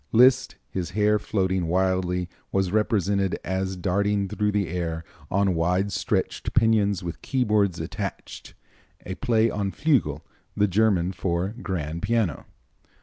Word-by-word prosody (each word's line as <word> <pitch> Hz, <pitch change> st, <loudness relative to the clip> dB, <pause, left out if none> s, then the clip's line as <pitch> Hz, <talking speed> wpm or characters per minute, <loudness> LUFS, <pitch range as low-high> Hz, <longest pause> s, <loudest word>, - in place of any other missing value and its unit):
Liszt, 130 Hz, +2 st, +5 dB
his 90 Hz, -3 st, -4 dB
hair 105 Hz, 0 st, +3 dB
floating 95 Hz, -4 st, 0 dB
wildly, 90 Hz, 0 st, +1 dB, 0.2 s
was 95 Hz, -2 st, +1 dB
represented 100 Hz, -3 st, +1 dB
as 95 Hz, 0 st, -2 dB
darting 100 Hz, +2 st, 0 dB
through 105 Hz, +2 st, 0 dB
the 100 Hz, -2 st, 0 dB
air 85 Hz, -1 st, -3 dB, 0.3 s
on 100 Hz, -1 st, +2 dB
wide 90 Hz, +4 st, +1 dB
stretched -, -, -2 dB
pinions 105 Hz, -4 st, +3 dB
with 85 Hz, -1 st, -6 dB
keyboards 105 Hz, -8 st, +1 dB
attached -, -, -6 dB, 0.5 s
a 95 Hz, -, -4 dB
play 115 Hz, +3 st, +2 dB
on 100 Hz, -1 st, -1 dB
Flügel, 110 Hz, -, +1 dB, 0.4 s
the 105 Hz, 0 st, +4 dB
German 95 Hz, -3 st, +2 dB
for 85 Hz, 0 st, -1 dB
grand 85 Hz, -8 st, -4 dB
piano. 115 Hz, -9 st, 0 dB
95 Hz, 130 wpm, -25 LUFS, 90-105 Hz, 0.5 s, Liszt